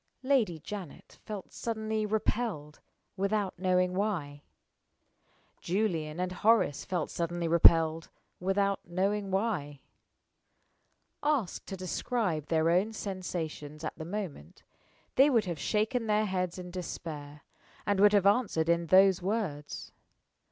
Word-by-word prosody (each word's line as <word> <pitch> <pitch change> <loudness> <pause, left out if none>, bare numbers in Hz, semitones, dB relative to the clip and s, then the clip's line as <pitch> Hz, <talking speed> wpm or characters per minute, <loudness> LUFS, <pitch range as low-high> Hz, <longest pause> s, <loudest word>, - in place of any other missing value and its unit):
Lady 250 -11 +2
Janet 180 +1 -9
felt 210 -3 -7
suddenly 220 -1 -2
repelled, 210 -8 -2 0.4
without 200 -1 -1
knowing 180 -1 +2
why. 175 -8 -2 1.2
Julian 170 -5 -1
and 180 0 -1
Horace 210 -6 +2
felt 180 -4 -2
suddenly 170 0 -2
repelled, 165 -1 +5 0.3
without 195 +2 +1
knowing 195 +3 -1
why. 190 -9 -1 1.4
Asked 290 -10 -1
to 195 - -5
describe 185 - -2
their 160 0 +2
own 195 +6 +2
sensations 165 -7 -5
at 155 - -4
the - - -7
moment, 170 - -6 0.5
they 275 +3 +7
would 230 -6 +3
have 170 -4 -4
shaken 225 +2 0
their 215 0 +2
heads 185 -3 -2
in 180 -1 -7
despair, 150 -4 -6 0.4
and 205 -1 +1
would 205 +1 +6
have 200 -2 +4
answered 200 -6 +2
in 170 0 +2
those 190 +1 +6
words. 180 -7 -3
185 Hz, 120 wpm, -30 LUFS, 165-210 Hz, 1.4 s, they